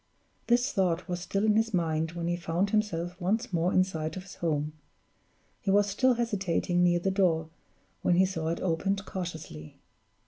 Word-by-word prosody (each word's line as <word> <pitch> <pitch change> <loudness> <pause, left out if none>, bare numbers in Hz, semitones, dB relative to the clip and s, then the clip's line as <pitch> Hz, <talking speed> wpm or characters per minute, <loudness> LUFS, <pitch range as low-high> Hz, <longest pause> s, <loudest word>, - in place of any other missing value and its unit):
This 245 +3 +3
thought 180 -4 0
was 175 -1 -2
still 195 +3 -1
in 215 -1 +4
his 225 -1 +2
mind, 160 -1 0
when 170 -1 -4
he 175 - +1
found 175 +3 -1
himself 180 -4 -1
once 215 +5 0
more 170 +2 +2
in 185 - +5
sight 160 -3 -4
of 185 - -6
his 195 - -12
home. 150 -2 -1 0.9
He - - -3
was 205 +1 +5
still 250 +5 +3
hesitating 195 -6 0
near 175 -1 +4
the 190 +3 0
door, 170 -5 +1 0.5
when 175 - +3
he 185 +2 +5
saw 165 -4 -3
it 165 +1 -2
opened 195 +3 0
cautiously. 160 - -7
180 Hz, 180 wpm, -29 LUFS, 165-195 Hz, 0.9 s, in